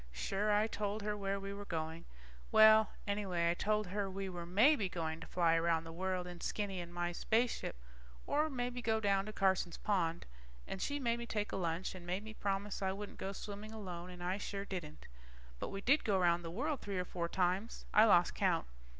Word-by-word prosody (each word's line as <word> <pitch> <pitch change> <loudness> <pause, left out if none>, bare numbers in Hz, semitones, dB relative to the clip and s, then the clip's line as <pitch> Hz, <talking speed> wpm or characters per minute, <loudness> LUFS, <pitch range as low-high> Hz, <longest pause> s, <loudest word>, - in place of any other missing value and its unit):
Sure, 195 - -1
I 210 +1 +4
told 210 -1 -2
her 210 0 -1
where 200 -1 -2
we 195 0 -5
were 200 0 -6
going. 160 -1 -4 0.5
Well... 220 0 +8 0.2
anyway 190 -5 +1
I - - +2
told 210 +3 +1
her 195 +1 -2
we 195 0 -4
were 175 -2 -6
maybe 215 - +4
going 160 -2 -3
to 165 - -9
fly 170 -2 +3
around 165 0 +2
the 165 - -8
world 185 +1 -1
in 175 -1 -8
Skinny 195 -3 -2
and 170 0 -8
my 175 0 -1
spaceship, 225 +7 0 0.5
or 305 +2 +2
maybe 245 -2 -3
go 220 -1 +1
down 200 -1 +2
to - - -4
Carson's 190 -4 +1
pond. 175 -5 0 0.4
And 190 - -5
she 285 0 -1
made 235 -3 0
me 235 - -5
take 210 -2 -2
a - - -2
lunch 175 0 -1
and 185 -2 -9
made 185 +3 -2
me 220 0 -8
promise 200 -1 -2
I 190 -1 +1
wouldn't 205 +1 -7
go 195 - -3
swimming 205 +2 -7
alone, 180 -5 -6
and 180 -1 -8
I 185 +3 -1
sure 200 -1 -4
didn't. 170 -6 -6 0.5
But - - -3
we 195 - -5
did 275 +8 +4
go 205 -3 +2
around 175 -1 +3
the 165 - -6
world 275 - -1
three 200 -2 -3
or 180 - -1
four 170 -1 -3
times. 185 +5 0
I 215 - +8
lost 175 -5 +5
count. - - +1
195 Hz, 215 wpm, -35 LUFS, 175-210 Hz, 0.5 s, Well